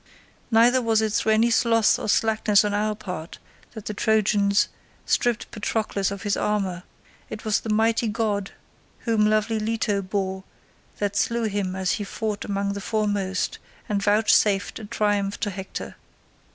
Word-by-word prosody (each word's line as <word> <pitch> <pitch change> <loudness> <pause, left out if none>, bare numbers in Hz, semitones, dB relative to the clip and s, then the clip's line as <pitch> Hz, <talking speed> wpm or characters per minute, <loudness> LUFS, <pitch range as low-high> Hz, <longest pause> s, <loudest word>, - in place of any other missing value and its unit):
Neither 240 +3 +5
was 225 -2 +2
it 215 -1 -1
through 220 - +2
any 230 +2 +3
sloth 230 -1 +3
or - - -4
slackness 215 -1 +3
on 205 - -1
our 210 +1 0
part 180 -6 -7 0.4
that 220 -3 -9
the 210 - -3
Trojans 205 -1 +2 0.4
stripped 240 -2 0
Patroclus 210 -2 -1
of 200 -1 -6
his 205 -2 0
armour; 195 -4 -1 0.5
it 215 - -8
was 215 -2 +2
the 225 - -7
mighty 225 +2 +2
god 210 -2 -1 0.5
whom 215 -2 +2
lovely 215 +1 +1
Leto 215 -2 0
bore 190 0 -3 0.5
that 205 -1 -2
slew 235 +3 +1
him 200 -3 -2
as 190 -1 0
he 210 - -1
fought 210 0 -3
among 200 0 -2
the 200 - -5
foremost, 205 -3 -1 0.3
and 205 -1 -1
vouchsafed 205 -1 +2
a 220 - -8
triumph 205 -2 0
to 205 - -1
Hector. 190 0 -7
210 Hz, 155 wpm, -24 LUFS, 200-220 Hz, 0.5 s, Neither